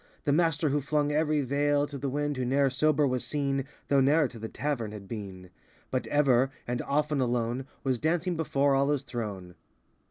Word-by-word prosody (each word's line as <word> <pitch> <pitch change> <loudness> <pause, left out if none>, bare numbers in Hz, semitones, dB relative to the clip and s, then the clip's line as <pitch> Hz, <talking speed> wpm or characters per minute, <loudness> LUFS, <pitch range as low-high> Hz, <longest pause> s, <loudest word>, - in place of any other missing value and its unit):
The 145 - +2
Master 160 -1 +2
who 145 +1 +1
flung 145 +1 0
every 150 0 +2
veil 145 +2 +1
To 145 0 -9
the 140 0 -3
wind, 145 +2 -1
who 130 - -2
ne'er 135 +2 +2
sober 150 +2 +2
was 130 -2 0
seen, 140 -2 -1 0.2
Though 140 -1 +4
ne'er 145 +2 +4
to 115 - -11
the 110 +1 -5
tavern 120 -8 -3
had 100 -2 -9
been; 95 -5 -7 0.4
But 130 - -1
ever—and 130 -3 +1
often 150 0 0
alone— 120 +1 -1 0.2
Was 130 -3 0
dancing 170 +4 0
before 140 -3 +1
Allah's 140 0 +2
throne. 100 -8 -5
140 Hz, 180 wpm, -28 LUFS, 125-145 Hz, 0.4 s, Though